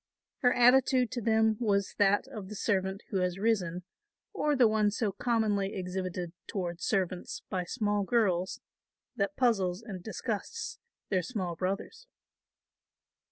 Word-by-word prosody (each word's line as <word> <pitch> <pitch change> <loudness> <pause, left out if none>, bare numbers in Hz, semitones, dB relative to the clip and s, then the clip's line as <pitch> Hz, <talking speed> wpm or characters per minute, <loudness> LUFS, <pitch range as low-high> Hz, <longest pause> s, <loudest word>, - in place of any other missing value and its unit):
Her 245 - +4
attitude 250 0 +5
to 250 -2 -3
them 220 -1 +3
was 200 -4 +1
that 205 +2 +4
of 210 -8 -7
the 210 - -6
servant 190 -2 -1
who 200 - 0
has 180 -1 0
risen 190 -5 0 0.5
or 300 -1 +1
the 250 -4 +6
one 215 -1 +3
so 210 0 -1
commonly 205 -2 0
exhibited 180 -2 -3
toward 175 -3 -3
servants 185 -3 -1
by 185 -2 -1
small 205 0 0
girls, 190 -5 +1 0.6
that 200 -1 -1
puzzles 200 -6 +2
and 195 -5 -7
disgusts 220 - -4 0.3
their 190 -3 +2
small 185 -5 -3
brothers. 195 - -4
205 Hz, 135 wpm, -30 LUFS, 185-230 Hz, 0.6 s, the